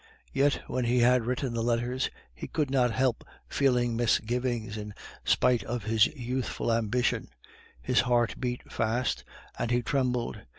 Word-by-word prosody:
Yet 140 +1 +2
when 125 -1 -2
he 120 +1 +3
had 125 -1 +4
written 125 0 -1
the 115 - -1
letters, 120 +2 0 0.2
he 60 - -7
could 150 -4 -1
not 125 -3 +3
help 130 0 0 0.2
feeling 125 -4 +2
misgivings 120 -1 0
in 105 -1 -6 0.3
spite 125 -2 +3
of 120 -1 -4
his 110 0 +4
youthful 125 -3 -2
ambition; 115 +2 0 0.5
his 60 - +1
heart 120 -2 +2
beat 125 -1 -4
fast, 115 +3 0 0.4
and 120 - -1
he 120 0 +1
trembled. 125 -2 -1
120 Hz, 145 wpm, -29 LUFS, 115-125 Hz, 0.5 s, had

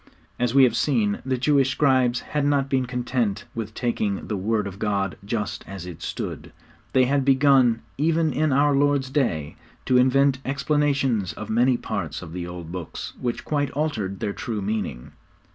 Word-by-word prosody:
As 125 +1 0
we 135 - +8
have 125 - +4
seen, 110 -8 +1
the 130 -1 -1
Jewish 135 +1 +3
scribes 130 -4 +2
had 150 -1 -2
not 140 -1 +1
been 130 -2 +1
content 120 -4 -1
with 110 -1 -5
taking 110 -5 -1
the 105 - -1
Word 105 +2 0
of 100 0 -7
God 100 -3 -1
just 105 0 -3
as 95 -2 -7
it 90 -3 -9
stood; - - -5 0.4
they 130 -1 +5
had 140 +1 +1
begun, 130 -4 +4 0.2
even 160 0 +2
in 155 +2 +1
our 140 +1 +3
Lord's 140 -2 +2
day, 85 - -1 0.3
to 130 - +3
invent 130 +1 +4
explanations 140 - 0
of 110 - -7
many 120 +2 +3
parts 100 -8 -4
of 80 -2 -9
the 90 -1 -4
old 85 -2 -8
Books 90 -3 -6
which 120 -1 -3
quite 145 -2 0
altered 110 -11 -2
their 100 - -1
true 110 -1 -4
meaning. 100 - -3
125 Hz, 175 wpm, -24 LUFS, 100-140 Hz, 0.4 s, we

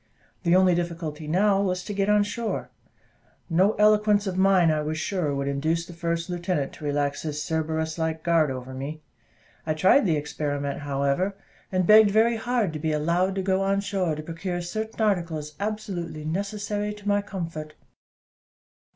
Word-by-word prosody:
The 170 0 +3
only 185 -1 +5
difficulty 165 -3 -3
now 195 +4 +3
was 180 -2 -1
to 205 - -5
get 200 0 0
on 210 0 +5
shore. 225 +2 -4 0.8
No 190 +6 +4
eloquence 210 -1 +4
of 190 -2 -2
mine, 190 -3 +4
I 155 -1 0
was 155 +1 -3
sure, 160 -4 -1
would 140 0 -2
induce 160 +4 0
the 175 - -11
first 170 0 -2
lieutenant 175 -5 -2
to 150 - -9
relax 145 0 -1
his 150 -2 -4
Cerberus 160 0 -2
like 160 0 -2
guard 165 -3 +3
over 130 0 -6
me. 145 +4 -6 0.6
I 155 -1 -1
tried 190 - +4
the 160 -3 +2
experiment, 145 -1 -3
however; 140 +7 0 0.4
begged 205 +3 +6
very 225 +3 +3
hard 230 -6 0
"to 155 - -4
be 155 +1 -1
allowed 170 +5 +1
to 190 - -1
go 190 0 +1
on 195 0 +1
shore 195 -5 -1
to 155 - -6
procure 175 +3 -4
certain 220 +6 -5
articles 170 -8 0
absolutely 185 -7 -4
necessary 205 +4 -2
to 205 -1 -11
my 205 0 +3
comfort." 165 -6 -6
175 Hz, 170 wpm, -25 LUFS, 155-200 Hz, 0.8 s, begged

